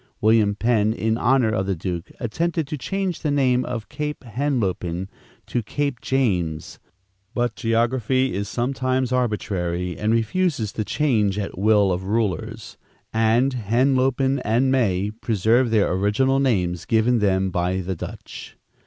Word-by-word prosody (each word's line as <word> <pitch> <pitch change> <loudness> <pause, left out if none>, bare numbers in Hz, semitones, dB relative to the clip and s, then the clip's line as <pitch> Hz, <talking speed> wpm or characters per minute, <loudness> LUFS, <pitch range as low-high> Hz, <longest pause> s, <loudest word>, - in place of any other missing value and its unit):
William 110 -1 +3
Penn, 110 -1 +2
in 110 -1 0
honor 125 -1 +2
of 95 -3 -1
the 95 - 0
duke, 85 0 -5
attempted 165 +7 -1
to 150 +2 -4
change 190 +5 -3
the 155 - -2
name 130 -3 +2
of 115 -4 -5
Cape 150 +7 -5
Henlopen 100 -8 -2 0.4
to 120 - -2
Cape 140 +3 -3
James; 90 -12 -1 0.6
but 120 -2 0
geography 120 +2 +1
is 100 +1 -3
sometimes 130 0 -1
arbitrary 95 -8 -1
and 105 +1 +1
refuses 115 - 0
to 110 - -3
change 105 -7 +1
at 100 -1 -4
will 105 0 +3
of 90 +1 -2
rulers, 110 +1 -2 0.4
and 115 +4 +2
Henlopen 130 +3 +1
and 120 +5 +2
May 105 -6 +1
preserve 115 +2 +1
their 110 -3 +2
original 105 +8 +2
names 90 -10 0
given 115 +2 +2
them 95 -2 +1
by 90 +2 0
the 95 +1 -3
Dutch. - - -9
115 Hz, 140 wpm, -23 LUFS, 100-130 Hz, 0.6 s, William